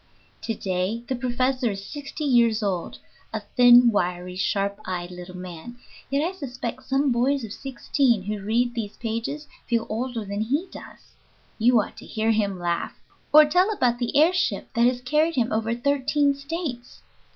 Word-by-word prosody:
To 225 - -3
day 190 +4 -2
the 260 - -1
professor 255 0 0
is 195 -1 -5
sixty 290 +3 -7
years 235 -5 +3
old 185 -4 -2 0.3
(a 220 - -3
thin, 245 -1 +8
wiry, 180 -2 -1
sharp 200 +2 -1
eyed 180 -1 -4
little 180 0 -9
man), 180 +6 -9 0.3
yet 280 +4 +1
I - - -3
suspect 260 -7 -5
some 270 +1 +1
boys 255 +3 +1
of 220 -2 -6
sixteen 260 -4 0
who 210 +1 -4
read 235 +4 +1
these 220 -4 -5
pages 235 +7 -4 0.2
feel 230 -1 +1
older 230 0 -3
than 200 +1 -3
he 280 +11 0
does. - - -13 0.5
You 240 +1 +5
ought 210 - -4
to - - -11
hear 220 0 0
him 205 -3 0
laugh! 175 -1 -2 0.3
or 305 +1 +9
tell 360 +7 +3
about 245 - +1
the 240 +1 -1
air 320 +5 +5
ship 365 0 -1
that 235 +1 +4
has 250 0 0
carried 305 +6 +1
him 240 -3 +1
over 225 +1 0
thirteen 280 +2 +1
States! 280 -3 -6
240 Hz, 175 wpm, -24 LUFS, 210-275 Hz, 0.5 s, or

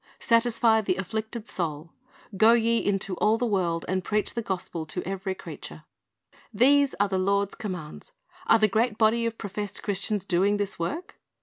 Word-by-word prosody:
"Satisfy 230 -1 +3
the 190 -3 0
afflicted 220 +4 -4
soul." 165 -3 -4 0.4
"Go 220 +4 +6
ye 230 0 +2
into 195 -1 -1
all 215 +1 +3
the 245 - -1
world, 175 -6 0
and 185 0 -1
preach 210 +1 -1
the 235 - -2
gospel 180 -5 -4
to 180 +3 -4
every 190 0 -3
creature."^ - - -9 0.7
These 275 +5 +4
are 205 - +3
the 190 -1 -1
Lord's 200 +1 +1
commands. 180 - -7 0.4
Are 225 - +6
the 215 -1 +4
great 220 +2 0
body 230 +1 +3
of 230 0 -5
professed 205 0 -5
Christians 205 0 -2
doing 195 +2 +2
this 205 -2 -3
work? 300 - -4
205 Hz, 170 wpm, -26 LUFS, 190-225 Hz, 0.7 s, Go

